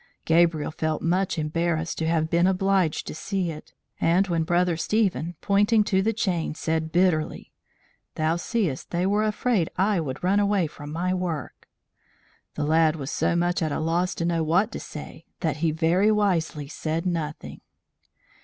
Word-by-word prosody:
Gabriel 165 Hz, -2 st, +3 dB
felt 155 Hz, 0 st, -2 dB
much 180 Hz, +2 st, +1 dB
embarrassed 165 Hz, +1 st, -1 dB
to 160 Hz, -, -1 dB
have 160 Hz, -1 st, +1 dB
been 170 Hz, +2 st, +3 dB
obliged 190 Hz, -3 st, +1 dB
to -, -, -6 dB
see 185 Hz, +1 st, -2 dB
it; 155 Hz, -, -11 dB, 0.3 s
and 185 Hz, +4 st, +2 dB
when 170 Hz, -1 st, +1 dB
Brother 175 Hz, +1 st, +1 dB
Stephen, 175 Hz, -, 0 dB
pointing 205 Hz, +2 st, +3 dB
to 190 Hz, -2 st, +1 dB
the 220 Hz, +3 st, +1 dB
chain, 180 Hz, -8 st, -1 dB
said 160 Hz, 0 st, -2 dB
bitterly, 175 Hz, -3 st, +1 dB, 0.6 s
"Thou 155 Hz, +1 st, +1 dB
seest 175 Hz, -, -2 dB
they 175 Hz, +1 st, 0 dB
were 205 Hz, +2 st, +2 dB
afraid 215 Hz, -4 st, +1 dB
I 195 Hz, +1 st, +2 dB
would 140 Hz, -1 st, -5 dB
run 195 Hz, +3 st, +3 dB
away 200 Hz, -3 st, +2 dB
from 145 Hz, -1 st, -8 dB
my 180 Hz, +3 st, -1 dB
work," 175 Hz, -6 st, -4 dB, 0.9 s
the 150 Hz, -, -1 dB
lad 160 Hz, 0 st, +3 dB
was 140 Hz, -2 st, -5 dB
so -, -, +1 dB
much 175 Hz, +1 st, +1 dB
at 155 Hz, -2 st, 0 dB
a -, -, -1 dB
loss 170 Hz, +3 st, 0 dB
to 170 Hz, -, -2 dB
know 170 Hz, -1 st, +1 dB
what 180 Hz, +8 st, +2 dB
to -, -, -5 dB
say, 155 Hz, +2 st, -9 dB
that 155 Hz, -3 st, -1 dB
he 165 Hz, +1 st, +1 dB
very 170 Hz, +6 st, +2 dB
wisely 170 Hz, -8 st, 0 dB
said 160 Hz, +3 st, -3 dB
nothing. 160 Hz, -4 st, -4 dB
170 Hz, 170 wpm, -25 LUFS, 160-190 Hz, 0.9 s, Gabriel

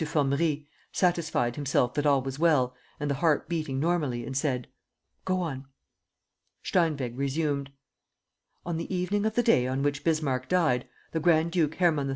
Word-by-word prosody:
Formerie, 150 Hz, 0 st, 0 dB, 0.3 s
satisfied 165 Hz, -9 st, +1 dB
himself 135 Hz, -4 st, +1 dB
that 145 Hz, 0 st, 0 dB
all 140 Hz, -2 st, +3 dB
was 135 Hz, +1 st, -5 dB
well 145 Hz, -7 st, +3 dB, 0.3 s
and 150 Hz, -, -2 dB
the 140 Hz, -, +1 dB
heart 160 Hz, -3 st, +2 dB
beating 155 Hz, -5 st, -2 dB
normally, 145 Hz, -7 st, 0 dB
and 130 Hz, +2 st, -6 dB
said: 130 Hz, -3 st, -1 dB, 0.6 s
"Go 185 Hz, -1 st, 0 dB
on." 135 Hz, -6 st, -4 dB, 1.0 s
Steinweg 145 Hz, -9 st, 0 dB
resumed: 140 Hz, 0 st, -1 dB, 0.9 s
"On 170 Hz, -2 st, -2 dB
the 165 Hz, -, -5 dB
evening 195 Hz, +3 st, 0 dB
of 220 Hz, -, -3 dB
the 240 Hz, -, +3 dB
day 125 Hz, -, +4 dB
on 130 Hz, +2 st, -1 dB
which 145 Hz, 0 st, -1 dB
Bismarck 140 Hz, -6 st, 0 dB
died, 160 Hz, -9 st, +2 dB, 0.2 s
the 165 Hz, -, -1 dB
Grand 165 Hz, 0 st, +3 dB
duke 160 Hz, -3 st, +1 dB
Hermann 160 Hz, -6 st, +2 dB
III. -, -, -3 dB
150 Hz, 165 wpm, -28 LUFS, 135-170 Hz, 1.0 s, day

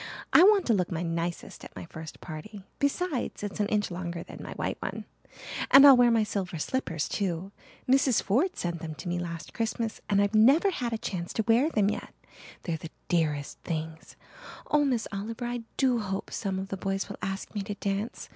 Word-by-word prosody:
I -, -, +9 dB
want 400 Hz, +1 st, +6 dB
to 235 Hz, -, +3 dB
look 180 Hz, -4 st, 0 dB
my 170 Hz, 0 st, -2 dB
nicest 170 Hz, 0 st, -3 dB
at -, -, -11 dB
my -, -, -7 dB
first 160 Hz, -1 st, -10 dB
party. 185 Hz, +5 st, -8 dB, 0.2 s
Besides, 285 Hz, -, -1 dB
it's 205 Hz, +1 st, -5 dB
an 205 Hz, -, +2 dB
inch 205 Hz, -2 st, 0 dB
longer 170 Hz, -1 st, -4 dB
than -, -, -10 dB
my -, -, -7 dB
white -, -, -3 dB
one. -, -, -4 dB, 0.6 s
And 275 Hz, +1 st, +10 dB
I'll 275 Hz, -2 st, +11 dB
wear 245 Hz, -1 st, +6 dB
my 230 Hz, -2 st, +3 dB
silver 190 Hz, -4 st, -3 dB
slippers 165 Hz, -, -2 dB
too. 190 Hz, -1 st, -2 dB, 0.4 s
Mrs. 260 Hz, -2 st, +4 dB
Ford 290 Hz, -, +1 dB
sent 170 Hz, -1 st, -2 dB
them 160 Hz, -1 st, -6 dB
to 140 Hz, -, -8 dB
me 175 Hz, 0 st, -1 dB
last 170 Hz, -1 st, -6 dB
Christmas 225 Hz, 0 st, -2 dB
and 200 Hz, -1 st, +3 dB
I've 200 Hz, +1 st, +2 dB
never 275 Hz, -, +6 dB
had 245 Hz, -9 st, -2 dB
a 225 Hz, -, -1 dB
chance 175 Hz, -5 st, -4 dB
to 220 Hz, -, -1 dB
wear 240 Hz, +7 st, +4 dB
them 210 Hz, -8 st, +2 dB
yet. -, -, -6 dB, 0.5 s
They're 165 Hz, -2 st, -2 dB
the 160 Hz, -, -8 dB, 0.2 s
dearest 150 Hz, -5 st, 0 dB
things. 160 Hz, -1 st, -5 dB, 0.6 s
Oh, 295 Hz, -1 st, +4 dB
Miss 245 Hz, -5 st, 0 dB
Oliver, 220 Hz, +4 st, -4 dB
I 240 Hz, 0 st, -3 dB, 0.2 s
do 255 Hz, -3 st, +3 dB
hope 195 Hz, -2 st, -4 dB
some 195 Hz, -3 st, -2 dB
of 190 Hz, +1 st, -4 dB
the 195 Hz, -, -3 dB
boys 195 Hz, +1 st, -2 dB
will 200 Hz, -, -8 dB
ask 195 Hz, 0 st, -4 dB
me 205 Hz, -, -2 dB
to 205 Hz, +1 st, -5 dB
dance. 200 Hz, +3 st, -3 dB
200 Hz, 205 wpm, -28 LUFS, 175-240 Hz, 0.6 s, I'll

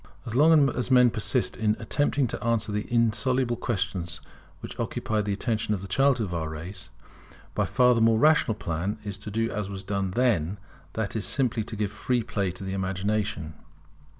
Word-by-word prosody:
As 115 Hz, -, -5 dB
long 150 Hz, +2 st, +6 dB
as 125 Hz, 0 st, -2 dB
men 125 Hz, -2 st, +6 dB
persist 120 Hz, +4 st, 0 dB
in 110 Hz, -1 st, +1 dB
attempting 140 Hz, +4 st, +1 dB
to 120 Hz, -, -5 dB
answer 115 Hz, -2 st, 0 dB
the 105 Hz, +2 st, -3 dB
insoluble 120 Hz, +2 st, +2 dB
questions 95 Hz, -7 st, -2 dB, 0.4 s
which -, -, -9 dB
occupied 105 Hz, -1 st, -1 dB
the 105 Hz, -, -1 dB
attention 105 Hz, +1 st, -1 dB
of 95 Hz, -, -7 dB
the -, -, -6 dB
childhood 130 Hz, +3 st, +2 dB
of -, -, -5 dB
our 80 Hz, -2 st, -2 dB
race, 85 Hz, +5 st, -6 dB, 0.6 s
by -, -, +1 dB
far 125 Hz, 0 st, +4 dB
the 115 Hz, -, +1 dB
more 115 Hz, 0 st, +5 dB
rational 150 Hz, -4 st, +4 dB
plan 90 Hz, +2 st, -3 dB
is 100 Hz, -2 st, -4 dB
to 100 Hz, -, -7 dB
do 115 Hz, +2 st, -1 dB
as 105 Hz, -1 st, -3 dB
was 95 Hz, -1 st, -6 dB
done 100 Hz, 0 st, -1 dB
then, 100 Hz, -5 st, +1 dB, 0.4 s
that 110 Hz, -2 st, -3 dB
is, 110 Hz, -, -1 dB
simply 125 Hz, -5 st, +1 dB
to 110 Hz, -, -6 dB
give 105 Hz, -1 st, -2 dB
free 120 Hz, +2 st, -1 dB
play 105 Hz, -5 st, -1 dB
to 90 Hz, +2 st, -8 dB
the 95 Hz, 0 st, -4 dB
imagination. 95 Hz, -3 st, -2 dB
110 Hz, 190 wpm, -26 LUFS, 95-120 Hz, 0.6 s, long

